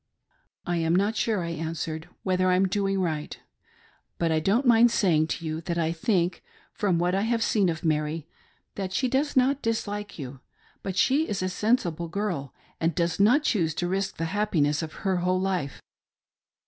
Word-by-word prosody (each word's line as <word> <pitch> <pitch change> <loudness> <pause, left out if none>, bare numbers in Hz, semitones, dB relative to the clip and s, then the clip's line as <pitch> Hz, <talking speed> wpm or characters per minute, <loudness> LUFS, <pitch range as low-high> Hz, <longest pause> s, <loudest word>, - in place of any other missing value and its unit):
"I 175 -1 0
am 165 0 +1
not 205 +4 +2
sure," 215 -4 0
I 170 - -3
answered, 160 0 -4
"whether 185 -1 +1
I 180 - +4
am 190 +1 +3
doing 195 0 0
right; 155 -5 -2 0.8
but 165 -1 +1
I 160 - +2
don't 205 - +1
mind 240 0 +6
saying 170 -9 +2
to 165 +1 -4
you 155 +1 -3
that 170 0 -3
I 165 -1 +1
think, 175 0 0 0.3
from 190 -5 +1
what 175 +1 +1
I 195 - +1
have 225 +1 +1
seen 200 -5 +2
of 160 +1 -4
Mary, 155 0 0 0.5
that 190 -2 -4
she 255 - +1
does 270 +3 0
not 270 +2 +3
dislike 205 -2 -3
you; 135 -3 -7 0.4
but 190 -1 -4
she 280 +9 +3
is 195 -2 -2
a 185 - 0
sen 215 +6 +2
sible 170 -6 -5
girl, 175 -8 -3 0.3
and 165 -1 0
does 170 +1 0
not 245 +9 +5
choose 165 - +1
to 175 - -1
risk 195 +1 -2
the 165 - -1
happiness 165 -8 +1
of 160 -1 -5
her 190 -1 +2
whole 180 +1 +1
life." 185 -7 -2
185 Hz, 190 wpm, -26 LUFS, 165-205 Hz, 0.8 s, mind